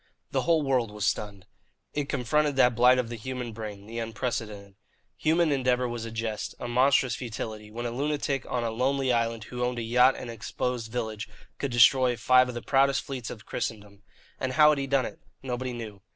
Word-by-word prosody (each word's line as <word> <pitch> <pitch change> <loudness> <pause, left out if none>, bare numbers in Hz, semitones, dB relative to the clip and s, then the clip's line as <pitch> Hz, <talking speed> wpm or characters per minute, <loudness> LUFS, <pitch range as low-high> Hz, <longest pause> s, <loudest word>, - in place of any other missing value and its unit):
The - - +1
whole 165 -2 +2
world 130 -5 +1
was 105 0 -4
stunned. 100 -2 -2 0.5
It 145 -1 -2
confronted 145 +3 +1
that 125 -2 +5
blight 125 +2 +5
of 125 -2 -1
the 120 - -5
human 125 0 -5
brain, 105 -2 -7
the 115 +2 -6
unprecedented. 110 -3 -4 0.4
Human 160 0 +2
endeavour 125 -2 +1
was 120 -1 -4
a 115 - -6
jest, 115 -1 -4
a - - -4
monstrous 125 0 +3
futility, 110 -3 -6
when 120 +3 -5
a 120 - -2
lunatic 140 +1 -1
on 125 -1 -1
a 115 - -1
lonely 130 +2 +1
island, 115 -1 0
who 125 +2 -5
owned 125 0 -1
a 120 - -2
yacht 125 +3 +4
and 120 - -6
an - - -8
exposed 115 +1 -3
village, 110 -3 -4 0.3
could 140 - -1
destroy 120 +2 +5
five 125 +2 +5
of 125 - -6
the 120 - -5
proudest 135 0 +3
fleets 130 -4 -5
of 110 - -9
Christendom. 105 -2 -5 0.4
And 130 0 -2
how 150 +2 +7
had 150 -2 +2
he 135 - -2
done 135 -1 +2
it? - - -8 0.2
Nobody 130 0 -3
knew. 110 -5 -7
120 Hz, 205 wpm, -27 LUFS, 115-130 Hz, 0.5 s, how